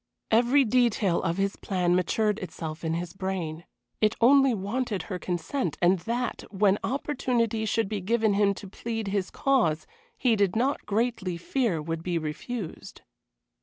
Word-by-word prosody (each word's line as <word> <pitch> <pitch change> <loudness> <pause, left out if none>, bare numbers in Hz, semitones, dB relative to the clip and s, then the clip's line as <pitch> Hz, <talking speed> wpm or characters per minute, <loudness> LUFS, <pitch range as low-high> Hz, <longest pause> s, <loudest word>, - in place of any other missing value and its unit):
Every 245 +5 +5
detail 220 -6 +2
of 165 +2 -1
his 195 0 0
plan 180 -2 +1
matured 210 +4 +1
itself 160 -3 -6
in 160 0 0
his 170 0 -4
brain. 180 -4 -4 0.4
It 215 -1 +3
only 270 +2 +6
wanted 210 -1 -2
her 185 0 -5
consent, 175 - -2
and 180 +1 +4
that, 235 +5 -3
when 200 0 +2
opportunity 245 -5 0
should 220 0 +1
be 205 -1 -3
given 220 +2 +2
him 200 0 +3
to 200 - -9
plead 225 +1 -4
his 195 -2 -1
cause, 220 - +1 0.3
he 240 -3 +3
did 200 -2 +1
not 260 +5 0
greatly 215 -5 -1
fear 180 - -1
would 165 +1 -3
be 175 0 -1
refused. 165 +6 -6
200 Hz, 155 wpm, -27 LUFS, 180-235 Hz, 0.4 s, only